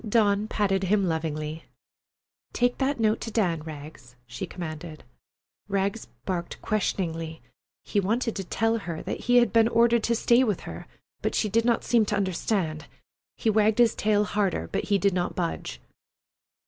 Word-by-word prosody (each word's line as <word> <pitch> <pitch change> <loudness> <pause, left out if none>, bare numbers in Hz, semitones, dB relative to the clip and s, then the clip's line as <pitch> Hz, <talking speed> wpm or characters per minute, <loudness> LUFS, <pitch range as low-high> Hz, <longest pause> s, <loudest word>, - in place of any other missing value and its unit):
Dawn 210 -1 +3
patted 195 -3 0
him 200 +2 +2
lovingly. 160 -1 -3 0.9
"Take 245 0 +1
that 275 -1 0
note 220 -1 +2
to - - -4
Dan, 180 -8 0
Rags," 145 -5 -10
she 120 0 -6
commanded. 160 -2 -7 0.7
Rags 200 +2 -1 0.2
barked 175 -3 -3
questioningly. 165 -6 -2 0.5
He 205 - +1
wanted 225 +4 0
to 195 - -3
tell 225 +5 0
her 170 -5 -5
that - - -4
he 245 - +1
had 240 -2 +4
been 225 -1 +5
ordered 235 0 +4
to 235 - +2
stay 235 +2 +4
with 210 -7 0
her, - - -8 0.3
but - - -1
she 215 - +1
did 230 +3 +2
not 235 -2 +2
seem 230 -3 +3
to 210 - 0
understand. 185 -4 -1 0.5
He 225 - +1
wagged 215 0 +3
his 240 -2 +5
tail 210 -1 +2
harder, 195 - -1
but - - -1
he 205 - +2
did 195 0 +2
not 175 -1 -1
budge. 170 -2 -3
200 Hz, 165 wpm, -26 LUFS, 165-225 Hz, 0.9 s, been